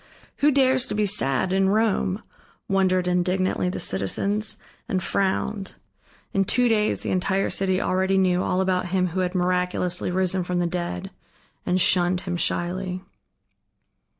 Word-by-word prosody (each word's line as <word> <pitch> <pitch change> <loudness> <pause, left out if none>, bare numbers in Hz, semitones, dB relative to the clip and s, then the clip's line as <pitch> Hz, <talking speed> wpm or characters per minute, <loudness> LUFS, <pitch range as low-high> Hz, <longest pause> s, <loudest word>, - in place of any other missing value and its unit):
Who 290 - +4
dares 260 -2 +3
to - - -3
be 210 0 +1
sad 185 -3 +1
in 190 0 +3
Rome, 210 -2 +1 0.4
wondered 185 -2 +2
indignantly 180 +1 0
the - - -4
citizens, 200 - -2 0.3
and 185 -2 -1
frowned. 195 +1 -1 0.6
In 195 - +2
two 245 +6 +2
days 215 -2 +1
the - - -3
entire 190 +1 0
city 190 -1 +1
already 190 0 +1
knew 185 -1 +2
all 185 0 0
about 185 -1 0
him 185 0 0
who 180 +3 -3
had 180 0 -1
miraculously 180 0 0
risen 185 0 0
from 180 0 -2
the 175 - +1
dead, 175 - -4 0.6
and 180 +1 +2
shunned 180 0 +2
him 180 -2 -4
shyly. 180 +2 -1
185 Hz, 150 wpm, -24 LUFS, 180-195 Hz, 0.6 s, Who